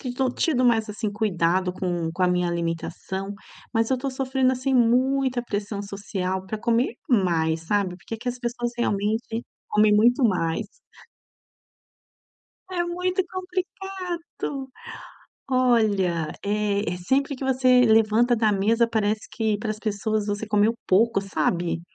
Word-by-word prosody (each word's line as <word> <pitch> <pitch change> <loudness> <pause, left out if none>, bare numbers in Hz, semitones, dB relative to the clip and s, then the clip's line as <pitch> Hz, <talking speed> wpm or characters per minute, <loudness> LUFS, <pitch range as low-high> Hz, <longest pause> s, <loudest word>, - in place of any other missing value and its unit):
tõ 260 0 +1
tido 260 -4 +1
mais 225 -2 +3
assim 210 0 -3
cuidado 185 -3 +1
com 175 -3 -2
com 185 +1 0
a - - +4
minha 180 0 +1
alimentação, 170 +3 -3 0.4
mas 225 +1 +1
eu 260 - +2
tô 270 +2 -3
sofrendo, 260 0 +1
assim, 260 +1 -1
muita 255 +1 +3
pressão 205 -2 -3
social 190 -2 -4
pra 215 +3 -4
comer 235 +2 +1 0.2
mais, 165 -8 +2
sabe, 200 -3 0
porque 190 - -9
aqui 235 +3 -4
as 245 +1 -6
pessoas 240 0 -2
realmente 225 +1 -1 0.2
comem 210 0 +4
muito 240 +5 +4
mais. 170 -7 +1 2.1
É 350 -1 0
muito 360 +2 -1
complicado, 365 -6 -5 0.8
olha, 215 -10 +2 0.2
eh, 205 -3 0
sempre 275 +10 0
que 265 - -6
você 255 -1 +4
levanta 225 +1 +4
da 220 -2 +2
mesa 225 +4 +2
parece 215 -1 -1
que 220 -3 0
para 215 +1 -4
as 215 - -8
pessoas 215 0 -1
você 205 +1 -2
comeu 210 +1 +3
pouco, 200 +2 +3
sabe? 175 -3 -1
220 Hz, 135 wpm, -24 LUFS, 195-255 Hz, 2.1 s, a